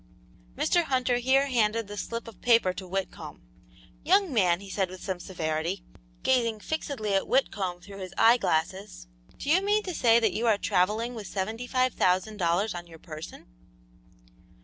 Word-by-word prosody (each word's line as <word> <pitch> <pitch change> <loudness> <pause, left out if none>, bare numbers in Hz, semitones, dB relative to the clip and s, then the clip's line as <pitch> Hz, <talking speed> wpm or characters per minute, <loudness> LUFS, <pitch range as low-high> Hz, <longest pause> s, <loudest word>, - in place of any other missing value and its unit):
Mr. 320 +5 +2
Hunter 255 -3 +1
here 260 +3 +3
handed 230 -4 +1
the 205 - -7
slip 230 +3 -5
of 225 - -12
paper 230 -6 +4
to 185 0 -8
Whitcomb. 190 +1 -5 0.6
"Young 375 0 +3
man," 180 -6 +3
he 200 - -11
said, 190 -1 -1
with 185 0 -10
some 190 -3 -3
severity, 170 0 -3 0.4
gazing 235 -4 +2
fixedly 240 -6 -3
at 195 - +1
Whitcomb 195 -9 0
through 195 +2 -11
his 185 -1 -7
eye 235 +2 +6
glasses, 185 - -2 0.3
"do - - -8
you 365 +4 +5
mean 415 +2 +1
to 365 - -4
say 235 -6 +4
that 225 - +1
you 235 +2 -1
are 215 -2 +4
travelling 210 +5 0
with 215 -4 -7
seventy 220 +5 -4
five 255 0 +1
thousand 185 +4 +1
dollars 180 +4 +1
on 175 -1 -7
your 165 -1 -13
person?" 155 -1 -10
215 Hz, 170 wpm, -27 LUFS, 185-245 Hz, 0.6 s, eye